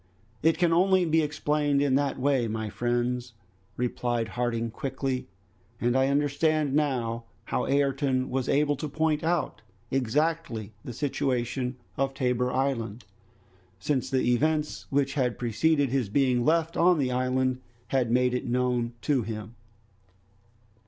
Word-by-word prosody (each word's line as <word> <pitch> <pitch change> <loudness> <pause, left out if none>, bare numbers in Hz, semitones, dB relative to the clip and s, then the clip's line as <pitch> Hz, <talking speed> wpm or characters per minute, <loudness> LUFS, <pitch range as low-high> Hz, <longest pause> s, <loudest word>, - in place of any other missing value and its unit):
"It 160 0 +3
can 170 -1 +3
only 185 +1 +4
be 160 0 +3
explained 150 -1 0
in 140 -2 +2
that 140 +1 +1
way, 130 -3 +1
my 110 0 -3
friends," 120 0 -1 0.4
replied 120 -2 -1
Harding 115 -1 -2
quickly, 135 0 -3 0.5
"and 120 +1 +1
I 130 0 +3
understand 145 +1 +1
now 120 -6 0 0.2
how - - -1
Ayrton 135 -1 +1
was 130 -1 -1
able 145 +1 +3
to 150 +1 -4
point 155 +1 0
out 165 -7 -1 0.3
exactly 135 -3 -1
the - - -6
situation 125 -1 -1 0.2
of 135 0 0
Tabor 125 -1 0
Island, 120 -4 -2 0.7
since 130 +7 -1
the 130 -1 +1
events 150 -7 0
which 140 -1 +1
had 125 -4 0
preceded 140 +5 +1
his 130 -6 0
being 125 0 +2
left 165 +3 +2
on 175 0 +4
the 130 -4 0
island 130 0 0 0.3
had 130 -3 +1
made 125 +1 +2
it 125 - -2
known 125 -1 0
to 140 -4 +2
him." 110 -1 -6
130 Hz, 140 wpm, -27 LUFS, 120-145 Hz, 0.7 s, only